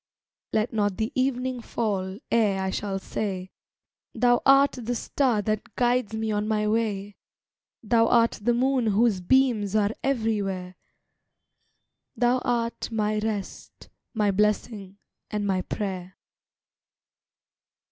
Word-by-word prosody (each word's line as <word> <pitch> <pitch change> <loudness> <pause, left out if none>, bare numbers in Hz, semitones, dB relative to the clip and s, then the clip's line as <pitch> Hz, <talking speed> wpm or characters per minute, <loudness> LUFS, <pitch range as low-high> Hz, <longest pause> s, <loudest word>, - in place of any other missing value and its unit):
Let 215 +2 0
not 205 -3 0
the 220 +1 -1
evening 255 -1 -1
fall 195 -5 -2
ere 210 -4 +2
I 190 - -1
shall 195 0 -2
say 190 -1 -4 0.6
"Thou 245 -1 +3
art 275 +1 +6
the 245 -1 -4
Star 240 -3 0
that 215 0 -3
guides 245 -2 +1
me 220 0 -2
on 210 0 -1
my 210 -1 0
way, 205 -2 -1 0.7
Thou 230 +1 +3
art 230 0 +3
the 240 +3 +2
Moon 255 -1 +1
whose 210 -2 +2
beams 220 -2 +2
are 210 -1 +3
everywhere, 205 -8 -1 1.4
Thou 245 +1 +2
art 235 -1 -2
my 215 -1 0
rest, 210 -2 -5 0.3
my 210 -2 +2
blessing, 205 -1 -1 0.3
and 210 -1 -2
my 190 -2 +1
prayer." 185 -2 -5
215 Hz, 120 wpm, -26 LUFS, 200-240 Hz, 1.4 s, art